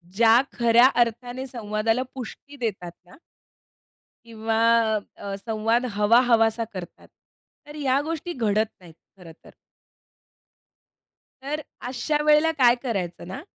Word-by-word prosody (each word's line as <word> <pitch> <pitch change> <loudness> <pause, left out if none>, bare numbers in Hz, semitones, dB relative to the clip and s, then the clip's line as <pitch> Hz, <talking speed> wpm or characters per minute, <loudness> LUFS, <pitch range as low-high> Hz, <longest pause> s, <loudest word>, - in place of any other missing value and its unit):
ज्या 230 +2 +5 0.2
खऱ्या 235 +1 +6 0.2
अर्थाने 245 +3 -6
संवादाला 225 0 -1
पुष्टी 265 +3 -9
देतात 200 -8 -4
ना 180 - -18 1.1
किंवा 225 -1 -2 0.6
अ, 200 -1 -6
संवाद 225 +3 -1
हवा-हवासा 230 +1 +3
करतात. 180 -3 -9 0.6
तर 295 - -11
या 275 -3 +1
गोष्टी 330 +2 -4
घडत 220 -4 0
नाहीत 170 -2 -15 0.2
खरं 175 -3 -13
तर. - - -16 1.9
तर, 300 +3 -3 0.3
अशा 265 +4 -1
वेळेला 305 +2 +4
काय 245 -3 +5
करायचं 185 -9 -4
ना 225 +9 -7
230 Hz, 110 wpm, -24 LUFS, 215-255 Hz, 1.9 s, खऱ्या